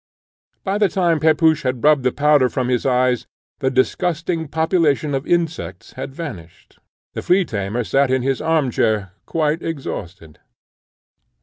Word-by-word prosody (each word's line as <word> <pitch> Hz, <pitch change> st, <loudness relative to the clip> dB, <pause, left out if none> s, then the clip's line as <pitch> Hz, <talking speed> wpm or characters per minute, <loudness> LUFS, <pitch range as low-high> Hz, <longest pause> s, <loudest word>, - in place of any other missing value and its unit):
By 200 Hz, +1 st, -1 dB
the 205 Hz, -2 st, +3 dB
time 170 Hz, -3 st, +1 dB
Pepusch 160 Hz, 0 st, +3 dB
had 130 Hz, -3 st, -2 dB
rubbed 150 Hz, -2 st, +5 dB
the 125 Hz, 0 st, +1 dB
powder 145 Hz, -2 st, +3 dB
from 125 Hz, -1 st, -2 dB
his 125 Hz, +1 st, 0 dB
eyes, 125 Hz, -1 st, +1 dB, 0.3 s
the 130 Hz, -2 st, +1 dB
disgusting 165 Hz, +5 st, 0 dB
population 160 Hz, -2 st, +1 dB
of 135 Hz, +1 st, -2 dB
insects 170 Hz, -2 st, -2 dB
had 135 Hz, -, -7 dB
vanished. 95 Hz, -, -9 dB, 0.3 s
The -, -, -4 dB
flea 180 Hz, +1 st, +3 dB
tamer 105 Hz, 0 st, -3 dB
sate 135 Hz, +4 st, +2 dB
in 130 Hz, -1 st, +1 dB
his 135 Hz, 0 st, -1 dB
arm 160 Hz, -5 st, +1 dB
chair 105 Hz, -4 st, 0 dB, 0.2 s
quite 160 Hz, 0 st, 0 dB
exhausted. 90 Hz, -, -6 dB
145 Hz, 145 wpm, -20 LUFS, 125-160 Hz, 0.3 s, rubbed